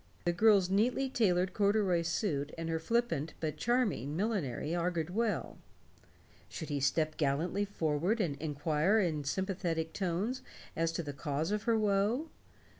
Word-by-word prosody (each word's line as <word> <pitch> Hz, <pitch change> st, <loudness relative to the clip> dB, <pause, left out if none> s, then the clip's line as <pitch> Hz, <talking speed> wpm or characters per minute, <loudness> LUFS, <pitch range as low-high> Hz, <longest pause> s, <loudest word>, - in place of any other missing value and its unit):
The 175 Hz, -, +2 dB
girl's 200 Hz, 0 st, +5 dB
neatly 245 Hz, +7 st, +2 dB
tailored 185 Hz, -6 st, +2 dB
corduroy 200 Hz, -4 st, +2 dB
suit 155 Hz, -4 st, -1 dB
and 165 Hz, 0 st, -4 dB
her 165 Hz, 0 st, 0 dB
flippant 195 Hz, -6 st, -1 dB
but 155 Hz, -2 st, -2 dB
charming 215 Hz, -, 0 dB
millinery 170 Hz, -, -1 dB
augured 170 Hz, -1 st, -1 dB
well. 220 Hz, +2 st, -1 dB, 0.9 s
Should 160 Hz, -, -6 dB
he 145 Hz, -1 st, -1 dB
step 155 Hz, +3 st, +1 dB
gallantly 160 Hz, +8 st, 0 dB
forward 175 Hz, +2 st, 0 dB
and 165 Hz, -9 st, 0 dB
inquire 155 Hz, +6 st, +1 dB
in 155 Hz, -7 st, 0 dB
sympathetic 170 Hz, -1 st, -2 dB
tones 200 Hz, +7 st, -1 dB, 0.3 s
as 165 Hz, 0 st, +1 dB
to 170 Hz, -, -2 dB
the 145 Hz, -2 st, -5 dB
cause 145 Hz, +4 st, -2 dB
of 210 Hz, 0 st, -1 dB
her 230 Hz, -2 st, +3 dB
woe? 215 Hz, +8 st, +1 dB
175 Hz, 145 wpm, -32 LUFS, 155-210 Hz, 0.9 s, girl's